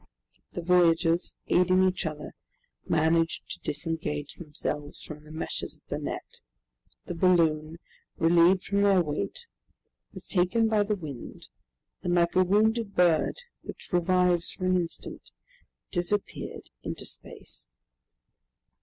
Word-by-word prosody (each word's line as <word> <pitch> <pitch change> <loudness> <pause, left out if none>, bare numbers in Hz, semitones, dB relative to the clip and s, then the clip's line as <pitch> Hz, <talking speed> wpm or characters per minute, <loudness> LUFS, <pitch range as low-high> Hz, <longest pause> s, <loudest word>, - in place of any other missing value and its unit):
The 175 - -4
voyagers, 170 -1 +3
aiding 185 +1 +4
each 185 -2 -1
other, 150 -1 -6 0.5
managed 165 +1 +2
to - - -5
disengage 150 -2 -3
themselves 150 -2 -4
from 150 -1 -9
the 155 - -14
meshes 160 - -4
of - - -31
the - - -2
net. - - -6 0.6
The - - -4
balloon, 165 -3 +2 0.4
relieved 175 +4 +4
of 200 - +4
their 195 -3 +5
weight, 165 - -3 0.7
was - - -11
taken 190 +5 +2
by 215 -1 +3
the 205 +1 +1
wind, 150 -10 -8 0.5
and 175 0 0
like 170 -1 +2
a 185 - +6
wounded 215 +3 +2
bird 175 -3 +3 0.2
which - - -10
revives 180 0 +2
for 185 - -5
an 185 0 +3
instant, 165 - -5 0.6
disappeared 180 +4 -3
into - - -6
space. - - -10
175 Hz, 125 wpm, -28 LUFS, 160-185 Hz, 0.7 s, a